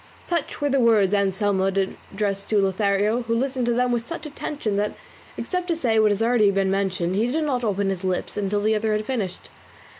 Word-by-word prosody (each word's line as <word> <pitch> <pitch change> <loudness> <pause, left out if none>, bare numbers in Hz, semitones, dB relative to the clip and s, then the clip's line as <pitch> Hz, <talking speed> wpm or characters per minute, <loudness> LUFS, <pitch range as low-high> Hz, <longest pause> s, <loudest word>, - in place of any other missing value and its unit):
Such 340 -4 -2
were 290 - 0
the 275 0 +2
words 215 -5 +4
Anselmo 200 -1 +1 0.5
addressed 200 -1 -2
to 215 - +3
Lothario, 200 +3 +1
who 230 -1 -1
listened 255 0 -1
to 240 - +2
them 250 +1 +1
with 235 -1 -1
such 335 -1 -6
attention 285 -7 -4
that, 210 +1 -1 0.4
except 360 -1 -3
to 340 - +1
say 235 -8 +1
what 215 -1 +5
has 205 - +1
been 225 - +3
already 225 -4 +4
mentioned, 190 -2 0
he 220 +4 +2
did 310 +6 0
not 260 -5 -1
open 200 -2 0
his 190 -1 -5
lips 185 -1 -2
until 205 0 -1
the 215 +1 +2
other 215 0 0
had 215 0 -1
finished. 215 -8 -4
215 Hz, 210 wpm, -23 LUFS, 195-245 Hz, 0.5 s, what